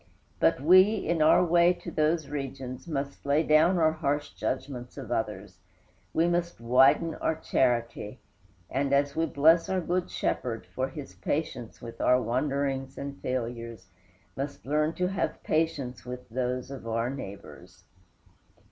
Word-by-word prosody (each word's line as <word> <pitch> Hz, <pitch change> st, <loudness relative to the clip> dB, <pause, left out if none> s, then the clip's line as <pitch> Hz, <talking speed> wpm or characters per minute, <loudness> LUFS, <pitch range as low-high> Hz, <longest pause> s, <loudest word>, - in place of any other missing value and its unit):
But -, -, +3 dB
we, 185 Hz, +8 st, +6 dB
in 170 Hz, -5 st, -1 dB
our 160 Hz, +3 st, +6 dB
way 175 Hz, +1 st, +5 dB
to -, -, -9 dB
those 155 Hz, 0 st, +1 dB
regions, 135 Hz, -1 st, -6 dB
must 140 Hz, -3 st, -4 dB
lay 145 Hz, +3 st, +2 dB
down 160 Hz, +4 st, +4 dB
our 160 Hz, -2 st, +4 dB
harsh 145 Hz, -2 st, -2 dB
judgments 125 Hz, +2 st, -4 dB
of 125 Hz, -4 st, -7 dB
others; 110 Hz, -3 st, -3 dB, 0.5 s
we 165 Hz, +1 st, +2 dB
must 175 Hz, 0 st, -1 dB
widen 135 Hz, +7 st, +4 dB
our 160 Hz, -, +1 dB
charity; 120 Hz, -6 st, -1 dB, 0.5 s
and, 140 Hz, +1 st, -1 dB
as 140 Hz, 0 st, +2 dB
we 165 Hz, 0 st, +1 dB
bless 160 Hz, +3 st, +4 dB
our 190 Hz, -, +1 dB
good 180 Hz, +1 st, -1 dB
Shepherd 115 Hz, -3 st, -2 dB
for 130 Hz, +1 st, -3 dB
his 140 Hz, 0 st, -9 dB
patience 135 Hz, -6 st, -4 dB
with 115 Hz, -1 st, -8 dB
our 125 Hz, 0 st, +4 dB
wanderings 135 Hz, +2 st, -1 dB
and 140 Hz, 0 st, -6 dB
failures, 115 Hz, -5 st, -4 dB, 0.5 s
must 140 Hz, +1 st, -5 dB
learn 150 Hz, +3 st, +1 dB
to 180 Hz, -, -1 dB
have 195 Hz, -, -2 dB
patience 150 Hz, -6 st, -1 dB
with 125 Hz, 0 st, -8 dB
those 125 Hz, +2 st, -2 dB
of 130 Hz, -4 st, -8 dB
our 115 Hz, +2 st, -1 dB
neighbors. 95 Hz, -7 st, -10 dB
140 Hz, 145 wpm, -28 LUFS, 125-160 Hz, 0.5 s, we